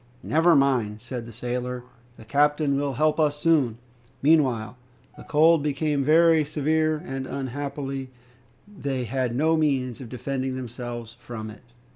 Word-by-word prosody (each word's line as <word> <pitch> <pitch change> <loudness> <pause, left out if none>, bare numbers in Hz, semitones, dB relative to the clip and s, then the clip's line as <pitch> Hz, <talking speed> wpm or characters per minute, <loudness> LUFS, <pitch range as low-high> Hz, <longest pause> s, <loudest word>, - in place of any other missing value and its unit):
"Never 165 +2 +4
mind!" 125 -7 +2
said 120 0 -6
the - - -9
sailor, 125 +1 -4 0.3
"the 110 - -13
captain 145 +3 +2
will 140 0 -1
help 155 +4 +1
us 150 -2 +2
soon." 145 -9 +2 0.5
Meanwhile 130 -8 +3 0.4
the - - -12
cold 160 +1 +4
became 145 0 0
very 160 +2 +5
severe, 155 +1 0
and 135 -4 -4
unhappily 135 0 -4 0.6
they 140 -11 -3
had 125 0 -2
no 160 +5 +3
means 135 -6 0
of 120 - -8
defending 130 +1 -3
themselves 120 -2 -6
from 115 -2 -8
it. - - -14
135 Hz, 140 wpm, -25 LUFS, 125-150 Hz, 0.6 s, very